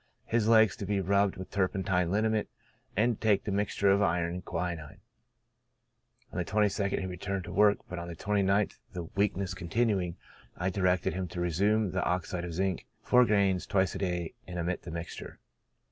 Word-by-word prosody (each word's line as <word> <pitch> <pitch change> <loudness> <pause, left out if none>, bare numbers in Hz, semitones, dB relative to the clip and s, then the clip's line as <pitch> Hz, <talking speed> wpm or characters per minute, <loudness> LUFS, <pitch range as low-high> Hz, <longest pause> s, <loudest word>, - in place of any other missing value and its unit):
His 115 -2 +1
legs 110 -3 +6
to 100 - -4
be 100 -1 +1
rubbed 100 +1 +2
with 95 - -8
turpentine 95 -2 +1
liniment, 110 +2 +1 0.5
and 120 +3 +3
to - - -12
take 105 -2 +4
the 105 - -3
mixture 100 0 +2
of 100 +1 +3
iron 85 -3 +1
and 90 0 -5
quinine. 85 -4 -4 1.3
On - - -4
the - - +1
22nd 100 +1 +1
he - - -3
returned 95 +1 -3
to 85 - -7
work, 105 +2 +5
but 90 - -5
on 85 - -6
the 85 - -6
29th 100 +2 +1
the 90 - -4
weakness 100 +1 -1
continuing, 95 -1 0 0.4
I 90 +2 -1
directed 90 -1 +1
him 95 0 -3
to 90 - -6
resume 100 +4 +1
the - - -1
oxide 90 0 -1
of 85 -2 -5
zinc, 95 0 -1 0.2
gr.iv 100 -7 +3
twice 95 -4 +2
a - - -5
day, 90 -3 -2
and 90 -1 -6
omit 85 +1 -2
the - - -9
mixture. 85 +1 -7
95 Hz, 180 wpm, -30 LUFS, 90-100 Hz, 1.3 s, legs